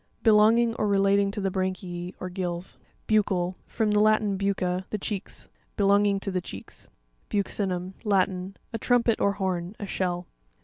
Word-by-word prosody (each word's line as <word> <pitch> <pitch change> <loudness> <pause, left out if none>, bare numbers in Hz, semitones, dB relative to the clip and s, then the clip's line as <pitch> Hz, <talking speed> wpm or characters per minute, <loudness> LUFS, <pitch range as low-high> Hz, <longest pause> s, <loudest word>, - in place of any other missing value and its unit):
— - - -38
Belonging 225 +2 +5
or 210 - +1
relating 200 0 +3
to 205 +2 -4
the 195 -1 -1
branchie, 185 -1 -3
or 185 - -4
gills. 180 -1 -4 0.3
Buc'cau.—F 190 -4 0
rom 215 -2 +3
the 210 - +3
Latin 215 -1 +3
bucce, 190 -2 -1
the 215 - -2
cheeks. 200 -1 -6 0.3
Belonging 200 0 +3
to 195 - -3
the 185 -1 -1
cheeks. 95 - -10 0.4
Buc'cinum.— 190 -2 -1
Latin. 190 -2 0 0.2
A 225 - -2
trumpet 235 0 +2
or 200 - +3
horn; 190 -1 -2
a 205 - -4
shell. 180 -2 -2
195 Hz, 160 wpm, -26 LUFS, 185-210 Hz, 0.4 s, Belonging